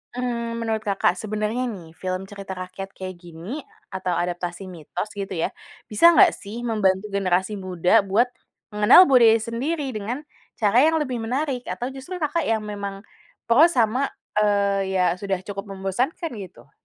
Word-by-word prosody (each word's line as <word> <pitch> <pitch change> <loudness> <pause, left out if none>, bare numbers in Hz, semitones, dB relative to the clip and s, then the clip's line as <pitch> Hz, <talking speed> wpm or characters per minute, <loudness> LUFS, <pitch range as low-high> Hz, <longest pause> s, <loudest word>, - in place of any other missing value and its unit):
mmm, 235 -2 -3
menurut 220 -1 -1
Kakak 195 -2 +1
sebenarnya 215 +4 -2
nih, 170 -4 -10
film 185 0 -3
cerita 195 -2 -7
rakyat 185 +1 -7
kayak 185 -1 -6
gini, 175 - -8 0.3
atau 190 -2 -2
adaptasi 175 +2 -3
mitos 180 +4 -6
gitu 195 -1 -4
ya, 165 - -1 0.4
bisa 335 +11 +6
nggak - - +7
sih 220 +4 -8
membantu 200 -3 +1
generasi 190 0 0
muda 185 +3 +3
buat 225 +6 +2 0.4
mengenal 210 - +7
budaya 230 -4 +6
sendiri 270 +6 -2
dengan 230 +7 -4 0.4
cara 210 +3 +3
yang 320 0 +3
lebih 255 -4 -2
menarik, 255 +2 -2
atau 245 +2 -4
justru 270 +8 -8
Kakak 305 +2 0
yang 220 -1 +1
memang 200 -2 -6 0.5
pro 275 +8 +7
sama, 255 -3 +1 0.3
eee, 200 -2 +1
ya, 185 - +3
sudah 195 -1 -2
cukup 200 +1 -6
membosankan 250 - -2
gitu? 175 -10 -11
210 Hz, 155 wpm, -23 LUFS, 190-245 Hz, 0.5 s, nggak